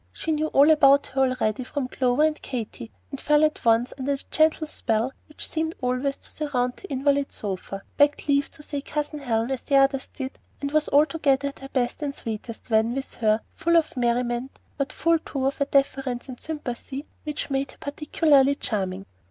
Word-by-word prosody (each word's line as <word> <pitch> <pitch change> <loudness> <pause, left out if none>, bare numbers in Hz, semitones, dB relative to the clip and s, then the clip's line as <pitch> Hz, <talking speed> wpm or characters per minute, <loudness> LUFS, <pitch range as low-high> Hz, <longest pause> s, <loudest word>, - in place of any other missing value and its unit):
She 320 - -3
knew 310 0 +1
all 290 +1 +6
about 280 -2 +6
her 270 - +1
already 255 -3 +1
from 260 +1 -3
Clover 255 +2 +1
and 310 0 +1
Katy, 235 -2 -5 0.2
and 275 - -6
fell 300 0 +4
at 305 - -2
once 230 +2 +3
under 280 +2 0
the 275 - -11
gentle 315 0 +3
spell 230 -3 -1
which 300 - -7
seemed 320 +1 -2
always 255 +2 -1
to - - -13
surround 250 -5 -1
that - - -11
invalid 280 +1 +1
sofa, 195 -1 -5
begged 290 +1 +3
leave 280 0 +2
to 300 - -13
say 285 -1 -4
"Cousin 300 +1 -3
Helen" 235 -2 0
as 265 - -2
the 280 - 0
others 270 0 +3
did, 265 -1 -6 0.2
and 280 0 -3
was 305 0 +2
altogether 285 -2 +3
at 280 - -13
her 270 - -9
best 245 +2 -1
and 285 -2 -3
sweetest 225 +1 -6
when 220 +2 +3
with 270 0 -4
her, 215 -1 +2
full 340 0 +2
of 320 -3 +1
merriment, 240 +1 -1 0.2
but 275 -2 -2
full 330 +3 +2
too 275 -4 -3
of 275 +2 -1
a - - +4
deference 270 -3 0
and 255 -2 -8
sympathy 280 -2 -5 0.2
which 300 -1 -4
made 275 0 0
her - - -15
particularly 285 -1 +3
charming. 195 -6 -3
275 Hz, 195 wpm, -25 LUFS, 245-295 Hz, 0.2 s, all